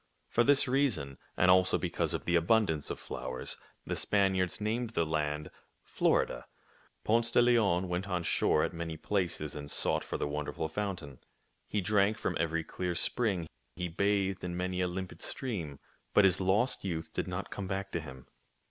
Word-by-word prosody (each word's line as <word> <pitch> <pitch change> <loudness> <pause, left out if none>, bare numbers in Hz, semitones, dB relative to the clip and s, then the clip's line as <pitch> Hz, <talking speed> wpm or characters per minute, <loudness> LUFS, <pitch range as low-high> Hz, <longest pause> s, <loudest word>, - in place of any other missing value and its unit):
For 120 - +3
this 140 +2 +5
reason, 120 - 0 0.2
and 90 0 +5
also 95 0 +4
because - - -1
of - - -5
the 90 - +2
abundance 85 -3 +2
of - - -4
flowers, 65 0 -4 0.3
the - - -2
Spaniards 95 -3 +2
named 115 +3 -1
the 85 - +2
land 75 -1 -2 0.3
Florida. - - +1 0.6
Ponce 115 +1 +2
de 115 - +3
Leon 105 -7 +3
went 90 +2 -2
on 90 -2 -1
shore 75 - +2
at - - -1
many 85 -1 -4
places 85 -5 -1
and 70 -1 -6
sought - - +1
for - - -4
the - - -1
wonderful 75 +2 -3
fountain. 85 -7 -4 0.5
He 105 - -1
drank 105 +2 +2
from - - -2
every 80 0 0
clear 90 +2 -3
spring. 95 -4 +1 0.3
He 90 0 -3
bathed 95 +1 0
in 90 -1 -3
many 90 0 -1
a 90 - +2
limpid 90 0 -6
stream. 85 - -3 0.4
But 105 - +7
his 95 0 +4
lost 105 +7 +2
youth 85 -4 -4
did - - -2
not - - -4
come 100 - -4
back 95 +1 -3
to 85 - -1
him. 65 -5 -10
90 Hz, 175 wpm, -31 LUFS, 80-105 Hz, 0.6 s, But